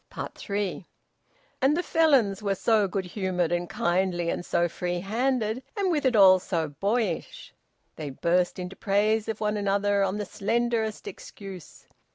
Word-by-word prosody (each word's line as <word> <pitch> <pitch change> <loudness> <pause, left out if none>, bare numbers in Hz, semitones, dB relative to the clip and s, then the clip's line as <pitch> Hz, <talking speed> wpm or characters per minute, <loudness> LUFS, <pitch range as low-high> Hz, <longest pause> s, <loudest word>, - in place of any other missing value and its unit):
THREE. 200 -3 -4 0.7
And 275 +4 +3
the 355 - 0
Felons 270 - +3
were 200 -2 0
so 215 0 +2
good 190 0 -3
humoured 180 -2 -1
and 175 0 -1
kindly 175 -1 0
and - - -3
so 175 0 +1
free 175 +1 -3
handed, 230 +2 0 0.2
and, 390 -2 +1
with 295 -5 +1
it 250 - +1
all, 190 -2 +7
so 165 -4 -2
boyish! 225 - -2 0.4
They 150 -2 -5
burst 175 +6 0
into 180 +1 -6
praise 215 +2 +1
of 220 - -3
one 210 0 0
another 200 0 +1
on 195 +1 0
the 210 - -3
slenderest 225 - -1
excuse. 200 - -10
200 Hz, 155 wpm, -26 LUFS, 180-225 Hz, 0.7 s, all